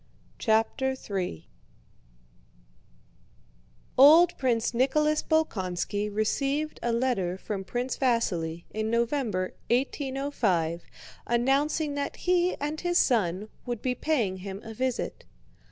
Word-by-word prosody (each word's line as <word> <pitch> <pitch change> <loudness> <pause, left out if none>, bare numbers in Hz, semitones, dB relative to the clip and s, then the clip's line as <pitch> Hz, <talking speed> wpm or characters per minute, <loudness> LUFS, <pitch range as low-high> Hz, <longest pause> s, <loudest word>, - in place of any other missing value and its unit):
CHAPTER 230 +4 +1
III 190 - -4 2.5
Old 325 +6 +8
Prince 240 -3 0
Nicholas 300 +5 +2
Bolkónski 205 - -1
received 275 +8 -1
a 235 - 0
letter 230 -7 0
from 195 0 -4
Prince 245 +6 -3
Vasíli 175 -10 0
in 220 0 -2
November, 235 -5 0 0.2
1805, 255 - 0 0.5
announcing 280 +5 +1
that 285 0 -3
he 360 0 +1
and 295 +2 -4
his 350 0 +1
son 205 - +2 0.2
would 240 -3 -4
be 255 - +1
paying 240 -9 0
him 195 +1 -7
a 225 -1 -8
visit. 255 +2 -3
240 Hz, 105 wpm, -27 LUFS, 205-285 Hz, 2.5 s, Old